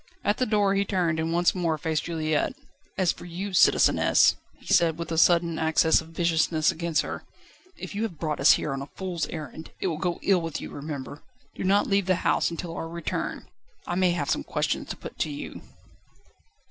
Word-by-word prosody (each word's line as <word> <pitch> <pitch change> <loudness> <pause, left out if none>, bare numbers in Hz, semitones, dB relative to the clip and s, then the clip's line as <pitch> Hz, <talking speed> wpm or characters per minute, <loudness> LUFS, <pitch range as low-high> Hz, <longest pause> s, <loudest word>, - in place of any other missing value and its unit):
At 205 - +1
the 255 - 0
door 205 -2 +2
he 200 0 +2
turned, 175 -5 0
and 160 +1 -1
once 175 +1 +3
more 170 -4 0
faced 155 0 -2
Juliette. 155 -2 -1 0.4
"As 185 -3 +3
for - - -10
you, 185 +3 -5
citizeness," - - +5 0.2
he - - -2
said, 165 -2 +4
with 170 -1 -6
a 165 - -1
sudden 170 -1 +3
access 160 0 +3
of 160 - -13
viciousness 165 -1 +1
against 165 -2 -1
her, - - -6 0.5
"if - - -7
you 205 - -3
have 220 -8 -3
brought 155 -2 -2
us 135 - +7
here 150 - -1
on 135 - -4
a 140 - -6
fool's 180 -4 -3
errand, 160 0 -8
it - - -4
will 165 -4 -1
go 175 0 -1
ill 190 -3 +3
with 165 -2 -4
you, - - -8
remember. 145 0 -7 0.3
Do - - -6
not 195 +2 +3
leave 195 -2 +1
the 185 - +3
house - - +2
until 170 0 -6
our 165 - -5
return. 170 -1 -4 0.4
I - - -3
may 185 0 +3
have 145 -5 -1
some - - 0
questions - - -2
to - - -4
put - - -10
to 155 - 0
you." 145 -1 -7
170 Hz, 210 wpm, -26 LUFS, 160-185 Hz, 0.5 s, us